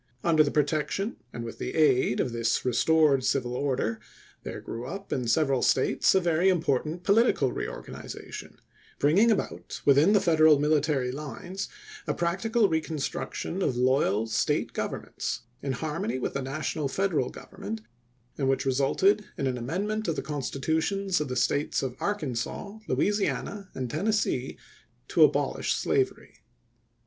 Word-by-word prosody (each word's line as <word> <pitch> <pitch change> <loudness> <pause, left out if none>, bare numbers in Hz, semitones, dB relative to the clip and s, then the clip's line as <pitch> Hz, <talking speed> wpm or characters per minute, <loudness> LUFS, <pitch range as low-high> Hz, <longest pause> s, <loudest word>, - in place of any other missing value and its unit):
Under 160 -2 +5
the 145 - 0
protection 155 - 0
and 120 - -6
with 115 - -7
the - - -4
aid 135 -6 +3
of 125 - 0
this 115 0 0
restored 140 +2 +3
civil 125 -2 0
order, 125 -4 -1 0.4
there - - -6
grew 120 +2 -6
up 195 +7 -5
in 125 -3 -2
several 135 +1 +2
States 130 - +3
a - - +6
very 175 +1 +2
im 185 -2 +3
portant 155 +3 -1
political 200 - +3
reorganization, - - -7 0.4
bringing 185 +11 +4
about 215 - -2
within 145 +8 +5
the 205 - +6
Federal 160 -5 +5
military 145 -3 +1
lines 155 +7 -6 0.4
a - - 0
practical 200 +6 +1
recon 160 -2 -1
struction 165 +5 -3
of 130 -9 0
loyal 125 -4 +2
State 110 -1 0
governments - - -4 0.2
in 135 -1 -2
harmony 160 - -2
with 130 - -3
the 140 - -2
national 140 +2 -2
Federal 160 -4 0
Government, 110 +2 -7 0.6
and 135 -2 +1
which 135 - +1
resulted 140 +10 +2
in 140 - -1
an 130 -1 0
amendment 195 - -2
of 165 - 0
the - - -3
Constitutions 160 +6 -1
of 150 - -2
the 125 - -4
States 145 +4 +1
of 130 -2 -3
Arkansas, 200 - -3
Louisiana, 205 -1 -1
and 130 -1 -3
Tennessee 205 - -1 0.5
to - - +5
abolish - - +2
slavery. 400 -2 -1
150 Hz, 145 wpm, -27 LUFS, 130-190 Hz, 0.6 s, a